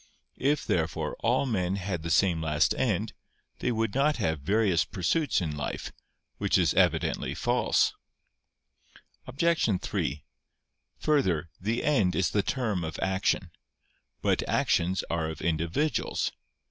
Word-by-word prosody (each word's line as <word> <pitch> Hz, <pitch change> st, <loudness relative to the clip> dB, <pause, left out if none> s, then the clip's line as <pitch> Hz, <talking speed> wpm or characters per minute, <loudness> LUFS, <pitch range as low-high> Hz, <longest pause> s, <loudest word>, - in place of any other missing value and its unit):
If, 145 Hz, +2 st, +1 dB
therefore, 80 Hz, -2 st, -1 dB
all -, -, +2 dB
men 95 Hz, -7 st, 0 dB
had 95 Hz, -3 st, -3 dB
the 85 Hz, -, -4 dB
same 85 Hz, 0 st, +3 dB
last 75 Hz, 0 st, +2 dB
end, 110 Hz, -2 st, -1 dB, 0.5 s
they 125 Hz, -, 0 dB
would 115 Hz, -3 st, -1 dB
not 145 Hz, +3 st, +2 dB
have 80 Hz, -, 0 dB
various 95 Hz, +1 st, +2 dB
pursuits 145 Hz, -, 0 dB
in 80 Hz, -4 st, -2 dB
life. 75 Hz, -, -4 dB, 0.5 s
Which -, -, +2 dB
is -, -, +3 dB
evidently -, -, +1 dB
false. -, -, +2 dB, 1.3 s
Obj. 135 Hz, -, +1 dB
3: 70 Hz, +1 st, -3 dB, 0.7 s
Further, 95 Hz, -, +1 dB
the 110 Hz, +5 st, -1 dB
end 105 Hz, -12 st, +2 dB
is 95 Hz, -, +1 dB
the 105 Hz, -, +2 dB
term 110 Hz, -6 st, -1 dB
of 80 Hz, -1 st, -4 dB
action. 95 Hz, -2 st, 0 dB, 0.7 s
But -, -, +2 dB
actions 90 Hz, +3 st, +1 dB
are 80 Hz, -1 st, -1 dB
of 80 Hz, -, -7 dB
individuals. 85 Hz, -, 0 dB
95 Hz, 130 wpm, -28 LUFS, 85-120 Hz, 1.3 s, same